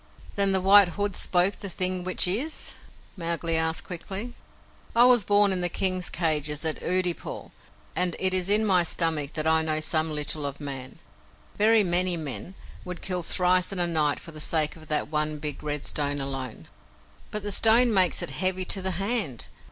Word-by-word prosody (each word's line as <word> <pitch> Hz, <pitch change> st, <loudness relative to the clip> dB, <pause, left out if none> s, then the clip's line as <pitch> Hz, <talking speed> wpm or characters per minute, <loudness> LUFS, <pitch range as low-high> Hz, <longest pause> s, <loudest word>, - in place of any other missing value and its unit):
"Then 200 Hz, -1 st, 0 dB
the 190 Hz, -1 st, +1 dB
White 200 Hz, +1 st, +6 dB
Hood 205 Hz, -2 st, -1 dB
spoke 180 Hz, +2 st, +1 dB
the 200 Hz, -, -7 dB
thing 185 Hz, 0 st, 0 dB
which 185 Hz, 0 st, +1 dB
is?" 250 Hz, -, +1 dB, 0.4 s
Mowgli 170 Hz, -2 st, -2 dB
asked 160 Hz, 0 st, 0 dB
quickly. 195 Hz, +7 st, -5 dB, 0.6 s
"I 240 Hz, +1 st, +7 dB
was 245 Hz, -3 st, +5 dB
born 205 Hz, +1 st, +3 dB
in 180 Hz, -, -2 dB
the 175 Hz, -, +2 dB
King's 185 Hz, 0 st, +1 dB
cages 150 Hz, -2 st, -1 dB
at 160 Hz, -, -3 dB
Oodeypore, 180 Hz, -1 st, -1 dB, 0.4 s
and 180 Hz, -1 st, +1 dB
it 185 Hz, 0 st, +3 dB
is 185 Hz, 0 st, 0 dB
in 215 Hz, +2 st, +3 dB
my 185 Hz, -4 st, +3 dB
stomach 160 Hz, -4 st, -1 dB
that 155 Hz, -1 st, -2 dB
I 160 Hz, 0 st, +3 dB
know 155 Hz, -1 st, -1 dB
some 155 Hz, 0 st, -1 dB
little 150 Hz, 0 st, -2 dB
of 140 Hz, -1 st, -5 dB
Man. 135 Hz, -3 st, -8 dB, 0.6 s
Very 220 Hz, +1 st, +4 dB
many 180 Hz, 0 st, +2 dB
men 160 Hz, +4 st, -6 dB, 0.3 s
would 180 Hz, -1 st, -8 dB
kill 180 Hz, -2 st, -2 dB
thrice 180 Hz, +2 st, +1 dB
in 195 Hz, -, -4 dB
a 175 Hz, -, +3 dB
night 155 Hz, -4 st, 0 dB
for 165 Hz, -, -9 dB
the 155 Hz, -1 st, -9 dB
sake 155 Hz, -1 st, 0 dB
of 155 Hz, -1 st, -15 dB
that 150 Hz, -1 st, -2 dB
one 150 Hz, 0 st, -2 dB
big 150 Hz, -1 st, -5 dB
red 150 Hz, -1 st, -4 dB
stone 145 Hz, -1 st, -2 dB
alone." 135 Hz, -3 st, -6 dB, 0.6 s
"But 210 Hz, -1 st, -5 dB
the 205 Hz, -, -4 dB
stone 230 Hz, +3 st, +5 dB
makes 185 Hz, -4 st, +2 dB
it -, -, -4 dB
heavy 185 Hz, +5 st, -1 dB
to 190 Hz, -, +1 dB
the 190 Hz, -, -2 dB
hand. 195 Hz, -, -2 dB
175 Hz, 190 wpm, -25 LUFS, 155-190 Hz, 0.6 s, I